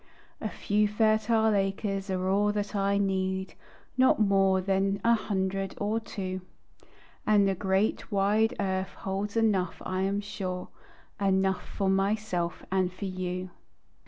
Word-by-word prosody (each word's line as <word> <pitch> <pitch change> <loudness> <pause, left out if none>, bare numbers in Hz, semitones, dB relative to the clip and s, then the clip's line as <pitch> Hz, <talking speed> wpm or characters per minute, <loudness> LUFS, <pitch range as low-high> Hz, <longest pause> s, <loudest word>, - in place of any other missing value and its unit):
A 215 - -2
few 210 +1 +1
fertile 220 +1 +3
acres 195 0 -1
are 185 0 -1
all 205 +2 +3
that 205 0 -2
I 200 0 +2
need, 190 -1 -1 0.4
Not 260 -2 +5
more 195 -2 +4
than 195 +1 +1
a 235 - +5
hundred 195 -3 -1
or 210 +2 0
two, 185 -4 -5 0.9
And 205 -2 +5
the 195 - +2
great, 190 +4 0
wide 210 +3 +2
earth 190 -1 -1
holds 200 +3 -2
enough, 200 -6 +1
I 185 0 -1
am 195 +1 0
sure, 190 -3 -5 0.5
Enough 190 -1 +2
for 195 - -3
myself 195 -3 0
and 185 -1 +1
for 185 +3 -6
you. 185 -1 -4
195 Hz, 135 wpm, -28 LUFS, 190-210 Hz, 0.9 s, Not